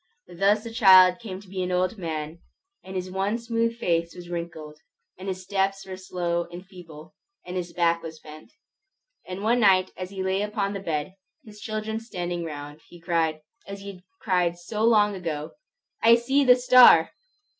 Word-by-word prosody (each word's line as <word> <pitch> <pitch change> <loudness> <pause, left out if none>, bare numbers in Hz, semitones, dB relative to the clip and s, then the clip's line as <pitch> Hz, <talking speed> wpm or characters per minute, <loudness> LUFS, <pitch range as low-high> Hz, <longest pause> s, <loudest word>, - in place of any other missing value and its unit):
Thus 200 +4 +2
the 230 -1 -8
child 185 -5 +7
came 195 -5 -7
to 205 - -18
be 185 0 -5
an 180 0 -2
old 185 +4 0
man, 160 -1 -5 0.4
and 190 - -9
his 185 0 -4
once 205 +5 -2
smooth 230 0 -1
face 170 -5 -1
was 175 -1 -11
wrinkled, 160 -3 -7 0.4
and 190 +2 -10
his 185 -1 -4
steps 195 0 -1
were 190 -1 -7
slow 175 -2 -3
and 175 +2 -11
feeble, 165 -5 -13 0.3
and 180 - -7
his 175 -1 -4
back 170 -1 +1
was 160 -1 -9
bent. 155 +7 -13 0.8
And 185 +2 -6
one 235 +3 +2
night 190 -4 +4
as 185 0 -6
he 190 -1 -5
lay 190 +1 0
upon 205 -1 -2
his 195 -1 -6
bed, 160 +4 -3 0.3
his 210 -1 -13
children 220 -1 -4
standing 175 -6 -5
round, 145 -1 -8
he 175 - -14
cried, 165 -2 -1 0.3
as 200 0 -8
he 200 0 -7
had 180 -2 -16 0.2
cried 180 -3 0
so 210 +5 -4
long 210 -3 +4
ago, 160 -5 -5 0.5
"I 230 +1 +7
see 270 +4 +1
the 250 -2 +7
star!" 250 -9 +7
185 Hz, 185 wpm, -25 LUFS, 170-210 Hz, 0.8 s, child